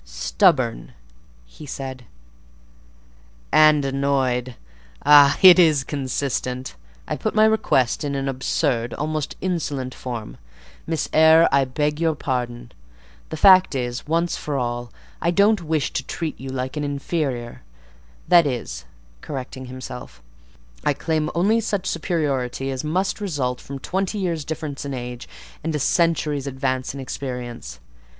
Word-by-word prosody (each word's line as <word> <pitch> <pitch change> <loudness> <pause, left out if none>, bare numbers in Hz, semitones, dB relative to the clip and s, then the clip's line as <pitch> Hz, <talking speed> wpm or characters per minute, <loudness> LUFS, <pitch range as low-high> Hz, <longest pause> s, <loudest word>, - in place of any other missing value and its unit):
"Stubborn?" - - +1 0.5
he 145 - -13
said, 130 -2 -6 1.5
"and 155 -2 +5
annoyed. 135 -3 0 0.5
Ah! 145 -1 +7
it 185 -1 +10
is 155 -6 +5
consistent. 130 -2 -3 0.3
I - - -2
put 215 - -3
my 215 0 +6
request 155 - +2
in 140 -1 -2
an 135 0 -2
absurd, 130 -2 -1
almost 155 -1 -3
insolent 150 -8 -2
form. 120 -4 -7 0.5
Miss 160 -1 -1
Eyre, 160 +1 +7
I 135 0 +3
beg 150 +3 -1
your 160 -2 +2
pardon. 120 -4 -4 0.6
The 160 - -5
fact 185 -2 +6
is, 120 0 -3
once 170 +2 0
for 145 -2 -3
all, 120 -1 -3 0.3
I 170 - +1
don't 200 +3 +3
wish 155 -3 -1
to - - -1
treat 165 -2 -5
you 135 - -7
like 130 +1 -4
an 150 - -2
inferior: 140 -4 -3 0.7
that 170 -3 +6
is" 125 -4 -4 0.4
(correcting 130 -1 -6
himself), 125 - -9 0.6
"I 145 - +2
claim 155 +1 -1
only 205 +7 +3
such 205 -4 -2
superiority 140 -6 -1
as 130 +1 -4
must 185 +7 -1
result 140 -10 -2
from 140 - -7
twenty 190 +8 -2
years' 170 -6 -2
difference 155 -3 -5
in 140 -1 -4
age 125 -1 -7 0.3
and 160 0 -2
a - - -1
century's 150 -3 +1
advance 130 -1 -2
in - - -7
experience. 125 - -6
140 Hz, 135 wpm, -22 LUFS, 130-160 Hz, 1.5 s, it